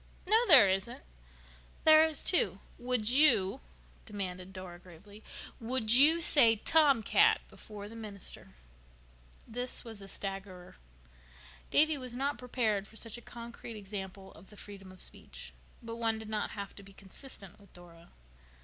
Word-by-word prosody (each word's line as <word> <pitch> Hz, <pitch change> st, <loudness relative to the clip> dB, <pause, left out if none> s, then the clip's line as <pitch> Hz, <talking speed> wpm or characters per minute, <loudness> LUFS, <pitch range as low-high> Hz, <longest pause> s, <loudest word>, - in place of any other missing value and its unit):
"No, 445 Hz, +4 st, +3 dB
there 265 Hz, -, +9 dB
isn't." 190 Hz, -, -3 dB, 0.8 s
"There 315 Hz, 0 st, +7 dB
is, 315 Hz, -3 st, 0 dB
too. 365 Hz, -, +2 dB, 0.2 s
Would 245 Hz, -2 st, +1 dB
you," 260 Hz, -6 st, +4 dB, 0.5 s
demanded 190 Hz, -3 st, -6 dB
Dora 185 Hz, -2 st, -10 dB
gravely, 190 Hz, +4 st, -16 dB, 0.4 s
"would 230 Hz, -1 st, -1 dB
you 305 Hz, +6 st, +7 dB
say 235 Hz, -8 st, +5 dB
'tomcat' 310 Hz, -, +3 dB
before 205 Hz, -1 st, -11 dB
the 225 Hz, -, -12 dB
minister?" 205 Hz, -, -9 dB, 0.9 s
This 245 Hz, +2 st, -4 dB
was 225 Hz, -3 st, -9 dB
a 195 Hz, -, -11 dB
staggerer. 195 Hz, -2 st, -7 dB, 0.9 s
Davy 310 Hz, -1 st, +3 dB
was 250 Hz, -2 st, -6 dB
not 275 Hz, +3 st, -2 dB
prepared 220 Hz, -5 st, -2 dB
for 225 Hz, -, -19 dB
such 230 Hz, +1 st, -5 dB
a -, -, -17 dB
concrete 235 Hz, -1 st, -10 dB
example 195 Hz, -1 st, -9 dB
of 190 Hz, -, -17 dB
the 210 Hz, -, -16 dB
freedom 195 Hz, -2 st, -12 dB
of 185 Hz, -, -13 dB
speech. -, -, -7 dB, 0.3 s
But 230 Hz, 0 st, -7 dB
one 225 Hz, -1 st, -1 dB
did 220 Hz, -1 st, -9 dB
not 215 Hz, -1 st, -3 dB
have 200 Hz, -1 st, -7 dB
to -, -, -10 dB
be 195 Hz, 0 st, -16 dB
consistent 195 Hz, 0 st, -13 dB
with 200 Hz, -2 st, -21 dB
Dora. 170 Hz, -1 st, -16 dB
215 Hz, 150 wpm, -31 LUFS, 195-250 Hz, 0.9 s, there